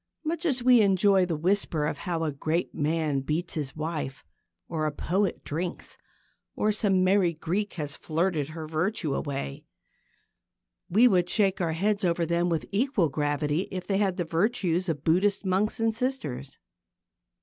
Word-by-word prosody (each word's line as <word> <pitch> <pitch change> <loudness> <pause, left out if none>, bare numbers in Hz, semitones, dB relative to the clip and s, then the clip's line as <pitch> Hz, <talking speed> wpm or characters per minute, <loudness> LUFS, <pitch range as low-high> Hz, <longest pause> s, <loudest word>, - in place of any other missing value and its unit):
Much 335 +2 -1
as 255 -5 0
we 250 -2 +6
enjoy 195 -1 +4
the 170 - -1
whisper 170 -2 +1
of - - -3
how 170 -3 -2
a 155 - 0
great 155 +5 -2
man 155 -2 0
beats 155 +6 -2
his 145 -4 -3
wife, 155 -3 -4 0.4
or 155 -2 -1
a - - -1
poet 185 +6 -1
drinks, 170 +4 -4 0.6
or 215 - +2
some 195 -3 +2
merry 185 -2 +3
Greek 185 +6 -2
has 150 -3 -4
flirted 160 -2 -1
her 160 0 -6
virtue 160 0 -1
away, 135 - -4 1.3
we 220 +8 +6
would 180 -5 +2
shake 195 -3 +2
our 165 -2 0
heads 200 +5 0
over 170 -1 +1
them 170 +1 +1
with 165 -2 -1
equal 205 - +1
gravity 145 +3 -1
if 185 -2 -5
they 195 - 0
had 195 -3 +1
the 175 - -1
virtues 180 0 0
of 150 -3 -2
Buddhist 195 +5 +2
monks 190 +4 +1
and 225 0 +2
sisters. 150 - -3
175 Hz, 160 wpm, -27 LUFS, 155-200 Hz, 1.3 s, we